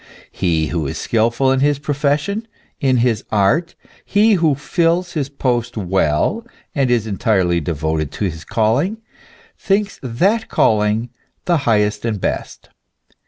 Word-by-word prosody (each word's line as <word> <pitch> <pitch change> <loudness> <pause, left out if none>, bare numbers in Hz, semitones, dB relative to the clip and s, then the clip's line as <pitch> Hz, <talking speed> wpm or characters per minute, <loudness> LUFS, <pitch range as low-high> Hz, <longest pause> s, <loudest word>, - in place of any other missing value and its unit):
He 80 -4 0
who 80 -4 -2
is - - -4
skilful 120 +4 +1
in 135 - +2
his 145 +1 +2
profession, 150 +9 -1 0.3
in 130 -4 +2
his 115 -4 0
art, 120 - +1 0.3
he 210 +2 +3
who 165 -6 +3
fills 170 +5 0
his 145 -4 -2
post 120 -4 -1
well, 95 - 0 0.3
and 135 -3 +1
is 120 -3 +2
entirely 95 -5 +1
devoted 80 -1 -2
to 105 - -2
his 80 -3 -4
calling, 130 - 0 0.6
thinks 200 +1 0
that 190 - 0
calling 110 +2 +1 0.3
the 175 -1 +3
highest 105 -1 +1
and 110 -3 -2
best. - - -4
120 Hz, 135 wpm, -18 LUFS, 105-155 Hz, 0.6 s, he